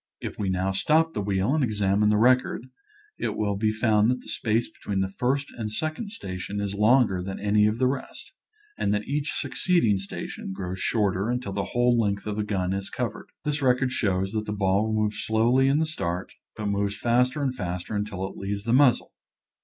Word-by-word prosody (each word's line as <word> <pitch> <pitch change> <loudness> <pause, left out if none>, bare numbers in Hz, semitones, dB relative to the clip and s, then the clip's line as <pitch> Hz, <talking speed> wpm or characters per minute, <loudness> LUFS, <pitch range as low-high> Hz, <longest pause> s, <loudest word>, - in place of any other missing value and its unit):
If - - -6
we 100 -2 0
now 95 +1 0
stop 160 +11 +2
the - - -2
wheel 100 +4 0
and 155 -2 +2
examine 105 -2 +2
the 105 - +3
record 125 +1 +3 0.5
it - - -2
will 105 -2 0
be 110 +2 +1
found 110 -1 +3
that 125 0 0
the - - -12
space 115 0 0
between 100 -2 -4
the 95 0 -1
first 140 +3 0
and 110 -3 -4
second 155 - -3
station 95 - -5
is 100 -1 -2
longer 105 -2 +3
than 95 +1 -5
any 105 +1 +3
of 105 +1 0
the 130 - +2
rest, 130 +1 -4 0.5
and - - +1
that 105 - -3
each 145 +2 -1
succeeding 145 - +1
space 95 - -6
grows 95 -1 -5
shorter 100 -1 +1
until 125 -5 -2
the 100 0 -1
whole 120 0 +2
length 100 -2 0
of 105 -1 -3
the 105 - 0
gun 95 -3 -1
is 95 0 -4
covered. - - -4 0.2
This 150 0 -1
record 125 -1 +2
shows 95 -5 0
that 110 0 -3
the 105 - -2
ball 100 +2 +1
moves 105 -1 0
slowly 120 +4 +3
in 140 +2 +3
the 160 - +2
start, 95 - -4 0.2
but 110 - -5
moves 100 0 0
faster 125 +5 +2
and 130 -2 0
faster 90 -2 -4
until 100 -2 -2
it - - -11
leaves 100 +1 -4
the 115 +2 0
muzzle. 130 -2 +4
105 Hz, 205 wpm, -26 LUFS, 100-125 Hz, 0.5 s, muzzle